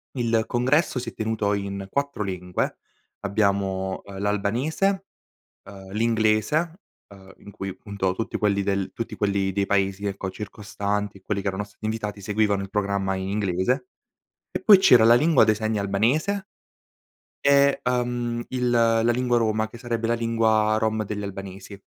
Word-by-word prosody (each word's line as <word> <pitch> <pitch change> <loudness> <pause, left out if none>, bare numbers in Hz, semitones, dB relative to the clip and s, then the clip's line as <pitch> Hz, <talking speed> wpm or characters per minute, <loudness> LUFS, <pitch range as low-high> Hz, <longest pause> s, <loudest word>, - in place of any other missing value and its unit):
Il 115 -2 +1
congresso 130 +3 +1
si 120 -1 -5
è - - -14
tenuto 110 -2 -1
in 100 -1 -4
4 140 -2 -2
lingue: 90 -2 -3 0.4
abbiamo, 100 -2 0
uhm 100 -1 -9
l'albanese, 120 - 0 0.6
uhm, 95 -1 -12
l'inglese, 115 - +1 0.3
uhm, 95 -1 -15
in - - -12
cui, 95 -1 -6
punto, 95 -2 -2
tutti 110 - -3
quelli 100 -2 +1
del 95 -1 -1
tutti 115 - -5
quelli 100 -2 0
dei 100 +1 0
paesi, 100 0 0
ecco, 95 -1 -3
circostanti, 100 0 -4
quelli 100 +1 -3
che 100 - -1
erano 95 +1 -2
stati 105 +1 -17
invitati, 105 -2 -3
seguivano 105 0 +1
il 95 - -7
programma 100 -1 0
inglese 95 +5 -1 0.6
e - - -3
poi 205 -2 +8
c'era 125 -11 +6
la 115 - +7
lingua 150 0 +5
dei 110 0 +3
segni 110 0 -1
albanese 130 - 0 0.9
e, 140 0 +4
uhm, 120 -1 -1
il 125 -1 -1
la 115 -1 +3
lingua 125 0 +1
roma, 110 -1 0
che 120 - -12
sarebbe 115 -2 -2
la 115 - +2
lingua 110 -2 +2
rom 110 0 0
degli 105 0 -4
albanesi. 100 0 -8
105 Hz, 155 wpm, -24 LUFS, 100-120 Hz, 0.9 s, poi